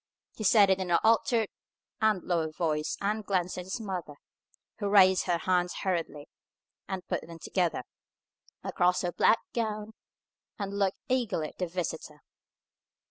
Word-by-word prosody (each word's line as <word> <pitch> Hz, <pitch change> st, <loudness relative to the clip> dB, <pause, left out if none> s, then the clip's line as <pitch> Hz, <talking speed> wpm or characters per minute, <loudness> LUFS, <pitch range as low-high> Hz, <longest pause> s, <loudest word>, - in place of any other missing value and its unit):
He 215 Hz, -, -6 dB
said 200 Hz, -1 st, +6 dB
it 190 Hz, -, +2 dB
in 185 Hz, -1 st, -3 dB
an 170 Hz, -, +5 dB
altered 225 Hz, 0 st, +3 dB, 0.5 s
and 215 Hz, -4 st, +2 dB
lower 165 Hz, -3 st, 0 dB
voice, 155 Hz, -2 st, -1 dB
and 215 Hz, +2 st, -1 dB
glanced 185 Hz, -3 st, -1 dB
at 180 Hz, -, -6 dB
his 190 Hz, +6 st, -4 dB
mother, 185 Hz, -8 st, -5 dB, 0.6 s
who 205 Hz, -2 st, -1 dB
raised 190 Hz, -2 st, +6 dB
her 175 Hz, -1 st, +2 dB
hands 180 Hz, 0 st, 0 dB
hurriedly, 170 Hz, -6 st, -2 dB, 0.6 s
and 185 Hz, -2 st, -5 dB
put -, -, -1 dB
them 170 Hz, 0 st, -10 dB
together 170 Hz, -4 st, -1 dB, 0.8 s
across 180 Hz, +1 st, +1 dB
her 175 Hz, -, 0 dB
black 225 Hz, -, +4 dB, 0.2 s
gown, 215 Hz, -2 st, -2 dB, 0.6 s
and 200 Hz, -1 st, -4 dB
looked 195 Hz, -1 st, +1 dB
eagerly 220 Hz, -12 st, 0 dB
at -, -, -22 dB
the 180 Hz, -, 0 dB
visitor. 165 Hz, -3 st, -5 dB
185 Hz, 150 wpm, -29 LUFS, 175-210 Hz, 0.8 s, said